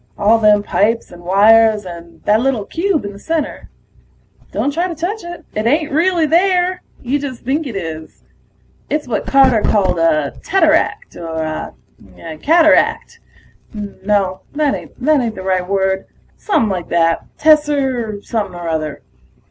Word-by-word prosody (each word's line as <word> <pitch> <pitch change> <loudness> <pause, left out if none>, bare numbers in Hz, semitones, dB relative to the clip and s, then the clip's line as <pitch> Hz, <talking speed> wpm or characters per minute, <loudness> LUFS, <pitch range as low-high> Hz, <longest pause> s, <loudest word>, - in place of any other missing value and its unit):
All 220 +3 +3
them 210 -1 +4
pipes 225 +3 0
and 175 0 -12
wires 210 +3 +4
and 170 -2 -11
that 210 +1 +3
little 250 -5 0
cube 340 - -1
in 200 - -6
the 200 - -12
center... 320 +4 -3 0.8
don't 285 - -1
try 345 +4 0
to 340 - -6
touch 365 +7 -4
it, 345 0 -9
it 215 +2 -1
ain't 300 +4 +1
really 335 +2 +2
there. 360 +3 +2 0.2
You 265 +4 0
just 270 -4 -6
think 285 +4 -1
it 235 - -7
is. 160 -4 -7 0.7
It's 300 -3 -2
what 225 -4 -3
Carter 265 -5 +4
called 195 -5 +1
a 155 -3 +1
teteract, 325 -5 +1
or 160 -2 -4
a 155 - -8
cataract... 320 - +3 0.6
no, 200 -2 -2
that 295 -2 +1
ain't 255 -5 -1
the 185 - -7
right 185 -1 -1
word. 190 -1 0 0.3
Somepin' 235 - 0
like 180 -3 -4
that 165 -1 +1
tesser 270 -9 +1
something 205 -6 -3
or 175 -1 -6
other. 155 -2 -3
225 Hz, 150 wpm, -17 LUFS, 185-300 Hz, 0.8 s, them